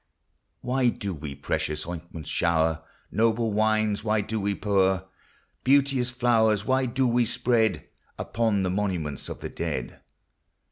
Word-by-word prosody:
249 -, -, -10 dB, 0.2 s
Why -, -, -12 dB
do 100 Hz, -2 st, -3 dB
we 75 Hz, -3 st, -7 dB
precious 75 Hz, +2 st, -2 dB
ointments 85 Hz, -2 st, -7 dB
show'r? 80 Hz, -1 st, +1 dB, 0.3 s
Noble 115 Hz, 0 st, +1 dB
wines 110 Hz, -1 st, +1 dB
why 110 Hz, -1 st, +1 dB
do 110 Hz, +1 st, -3 dB
we 100 Hz, 0 st, 0 dB
pour? 95 Hz, -2 st, +1 dB, 0.6 s
Beauteous 135 Hz, -2 st, +3 dB
flowers 115 Hz, -4 st, +2 dB
why 130 Hz, 0 st, +2 dB
do 130 Hz, +2 st, 0 dB
we 120 Hz, 0 st, +3 dB
spread, 115 Hz, -1 st, +1 dB, 0.3 s
Upon 110 Hz, -4 st, 0 dB
the 90 Hz, -, 0 dB
monuments 90 Hz, -8 st, -2 dB
of -, -, -7 dB
the -, -, -5 dB
dead -, -, -4 dB
105 Hz, 140 wpm, -26 LUFS, 90-120 Hz, 0.6 s, Beauteous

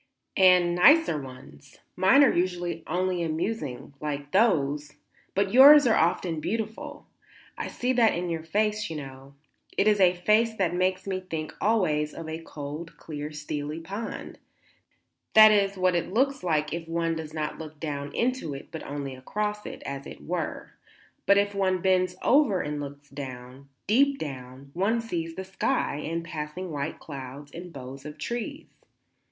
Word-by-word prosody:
"And 180 Hz, -2 st, +5 dB
nicer 180 Hz, -, +5 dB
ones. 130 Hz, -, -13 dB, 0.2 s
Mine 190 Hz, +10 st, +6 dB
are 275 Hz, -, +5 dB
usually 175 Hz, -2 st, -1 dB
only 180 Hz, +1 st, 0 dB
amusing, 160 Hz, -, -3 dB
like 145 Hz, -1 st, -4 dB
those; 150 Hz, -8 st, +2 dB, 0.4 s
but 195 Hz, +1 st, +1 dB
yours 285 Hz, +3 st, +9 dB
are 230 Hz, -, +4 dB
often 165 Hz, 0 st, +1 dB
beautiful. 220 Hz, +5 st, -4 dB, 0.5 s
I -, -, -4 dB
see 250 Hz, +1 st, -1 dB
that 235 Hz, -3 st, +4 dB
in 175 Hz, +1 st, -2 dB
your 165 Hz, -1 st, -2 dB
face, 210 Hz, +5 st, 0 dB
you 160 Hz, -, -5 dB
know. 135 Hz, -1 st, -9 dB, 0.4 s
It 205 Hz, -, +3 dB
is 210 Hz, -1 st, +4 dB
a 180 Hz, -1 st, +5 dB
face 215 Hz, +5 st, +2 dB
that 185 Hz, -5 st, 0 dB
makes 185 Hz, +1 st, 0 dB
me 190 Hz, -1 st, -2 dB
think 160 Hz, -4 st, -5 dB
always 155 Hz, -9 st, +1 dB
of 165 Hz, -, -7 dB
a 160 Hz, +1 st, -5 dB
cold, 150 Hz, +1 st, -8 dB
clear, 150 Hz, -1 st, -6 dB
steely 150 Hz, 0 st, -5 dB
pool; 200 Hz, +7 st, -6 dB, 1.0 s
that 215 Hz, 0 st, +10 dB
is 200 Hz, -1 st, +2 dB
what 185 Hz, 0 st, +2 dB
it 175 Hz, +1 st, -1 dB
looks 270 Hz, +5 st, +1 dB
like 155 Hz, -3 st, 0 dB
if 165 Hz, -1 st, -5 dB
one 165 Hz, 0 st, -1 dB
does 160 Hz, -1 st, -6 dB
not 155 Hz, -1 st, -4 dB
look 155 Hz, -2 st, -9 dB
down 145 Hz, -2 st, -4 dB
into 245 Hz, -, -1 dB
it 135 Hz, -, -10 dB
but -, -, -6 dB
only 140 Hz, -1 st, -5 dB
across 210 Hz, +11 st, -3 dB
it, -, -, -8 dB
as 140 Hz, 0 st, -5 dB
it -, -, -10 dB
were; 170 Hz, -2 st, -4 dB, 0.6 s
but 200 Hz, +1 st, +6 dB
if 205 Hz, 0 st, +2 dB
one 190 Hz, -2 st, +1 dB
bends 185 Hz, 0 st, +2 dB
over 255 Hz, -9 st, +4 dB
and 150 Hz, 0 st, -3 dB
looks 145 Hz, 0 st, -8 dB
down, 130 Hz, -1 st, -9 dB, 0.2 s
deep 275 Hz, +6 st, +3 dB
down, 135 Hz, -, -8 dB
one 200 Hz, +6 st, +1 dB
sees 170 Hz, -8 st, -4 dB
the 190 Hz, -, -5 dB
sky 190 Hz, -, -1 dB
and 165 Hz, +2 st, -4 dB
passing 160 Hz, +3 st, -5 dB
white 145 Hz, 0 st, -3 dB
clouds 140 Hz, 0 st, -9 dB
and 175 Hz, +2 st, -9 dB
boughs 135 Hz, -1 st, -9 dB
of 150 Hz, +1 st, -9 dB
trees. 240 Hz, -, -4 dB
170 Hz, 165 wpm, -27 LUFS, 150-200 Hz, 1.0 s, that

